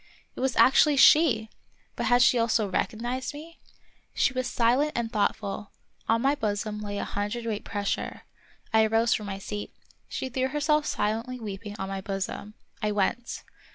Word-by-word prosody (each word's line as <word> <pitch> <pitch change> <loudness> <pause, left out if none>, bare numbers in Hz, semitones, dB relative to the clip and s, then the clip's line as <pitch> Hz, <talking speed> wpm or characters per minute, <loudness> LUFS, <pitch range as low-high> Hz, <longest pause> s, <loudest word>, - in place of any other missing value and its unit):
It - - -9
was 260 0 0
actually 285 +2 +5
she! 270 -7 +6 0.5
But - - -2
had 245 0 +5
she 245 - +4
also 230 -2 +2
recognized 240 +7 -2
me 325 +3 -11 0.3
} - - -37
She 265 - +2
was 255 -1 -1
silent 250 +6 +2
and 235 -1 -2
thoughtful; 205 -1 -1 0.4
on 230 +1 +3
my 275 +1 +4
bosom 210 -5 -2
lay 205 -1 -4
a - - -2
hundredweight 210 +1 -3
pressure. 205 -2 -3 0.5
I 220 0 +6
arose 225 +1 +3
from 210 - -2
my 195 -1 -4
seat. 205 +1 -6 0.3
She - - -4
threw 260 0 -1
her 295 +3 -3
self 300 0 +2
silently 230 +4 -2
weeping 205 -1 -6
on 190 - -4
my 195 0 -4
bosom. 195 +2 -4 0.3
I 210 - 0
went. 210 +4 -1
225 Hz, 170 wpm, -27 LUFS, 205-255 Hz, 0.5 s, she